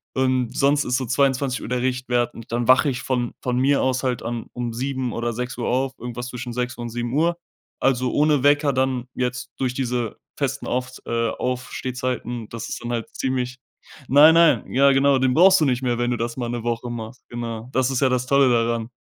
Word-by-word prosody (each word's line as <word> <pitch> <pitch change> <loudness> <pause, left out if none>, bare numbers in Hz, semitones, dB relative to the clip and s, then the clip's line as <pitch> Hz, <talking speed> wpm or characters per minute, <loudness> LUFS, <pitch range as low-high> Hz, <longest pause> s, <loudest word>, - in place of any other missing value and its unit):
Und 130 -2 0
sonst 145 +1 +3
ist 125 0 +1
so 130 - -2
22:00 135 0 0
der 125 0 -1
Richtwert. 125 -2 0
Und 115 0 -12
dann 120 +1 -1
wache 130 +3 +5
ich 125 -1 -3
von 125 -2 -1
von 125 -1 -1
mir 140 +2 +3
aus 130 0 0
halt 125 -2 -1
dann 115 -1 -4
um 120 -1 -4
7:00 130 0 -2
oder 120 0 -2
6:00 125 0 -4
auf, 130 +1 0
irgendwas 120 +1 -6
zwischen 125 -1 -6
6:00 125 +1 -3
und 120 0 -5
7:00. 130 +9 0 0.4
Also, 130 -1 +1
ohne 150 -2 +3
Wecker 145 0 +4
dann 130 -1 0
jetzt 125 0 -3
durch 130 -2 -1
diese 125 -4 -2 0.2
festen 140 -1 -2
Aufs 125 +1 -3
äh, 115 0 0
Aufstehzeiten, 125 -2 -3
das 115 -1 -6
ist - - -5
dann 120 - -4
halt 115 -2 -3
ziemlich 125 -1 -2 0.5
Nein, 150 +4 +7
nein, 165 -2 +4
ja 140 +1 +5
genau, 135 0 +4
den 130 -1 +2
brauchst 185 +2 +6
du - - +4
nicht 125 -2 +1
mehr, 120 -2 0
wenn 120 0 0
du 120 - 0
das 115 +1 -3
mal 120 -2 -3
'ne 120 -1 -4
Woche 120 +1 -2
machst, 115 +1 -7
genau. 115 0 -5
Das 130 -1 +1
ist 130 - -1
ja 135 - +4
das 125 0 0
Tolle 140 -1 +4
daran. 115 -1 0
125 Hz, 210 wpm, -23 LUFS, 120-130 Hz, 0.5 s, Nein